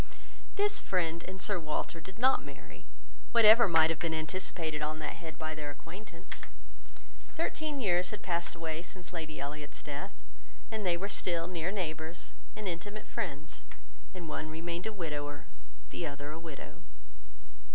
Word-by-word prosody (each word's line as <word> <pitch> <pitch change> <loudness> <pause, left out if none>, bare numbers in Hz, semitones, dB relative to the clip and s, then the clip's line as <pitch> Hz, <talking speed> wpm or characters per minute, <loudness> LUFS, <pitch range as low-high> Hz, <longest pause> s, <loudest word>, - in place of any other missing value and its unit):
This 410 0 +5
friend, 170 -2 +1
and 190 +1 -5
Sir 200 0 +2
Walter, 160 +1 -2
did 190 +4 -9
not 260 +3 +5
marry, - - -10 0.5
whatever 230 0 +10
might 165 -2 +7
have 165 - -1
been 165 -1 +1
anticipated 160 -1 -1
on 155 +1 0
that 155 +1 -3
head 160 -3 -6
by 155 0 -2
their 150 -2 -3
acquaintance. 170 +4 -8 0.9
Thirteen 310 -3 0
years 180 -6 +4
had 210 -1 -5
passed 170 -2 0
away 165 -1 -2
since 180 +1 -7
Lady 155 -2 -3
Elliot's 145 +1 -4
death, 150 +7 -4 0.6
and 215 -3 0
they 170 -1 +4
were 195 +3 -1
still 175 -4 +1
near 170 -1 -1
neighbours 160 -3 -3 0.2
and 215 - -3
intimate 205 +5 -3
friends, 160 -9 -3 0.5
and 180 -3 -6
one 155 0 -2
remained 170 +4 -2
a - - 0
widower, 150 -6 -3 0.5
the 170 - -1
other 145 0 -4
a 160 - -5
widow. 160 -4 -8
170 Hz, 155 wpm, -34 LUFS, 155-190 Hz, 0.9 s, whatever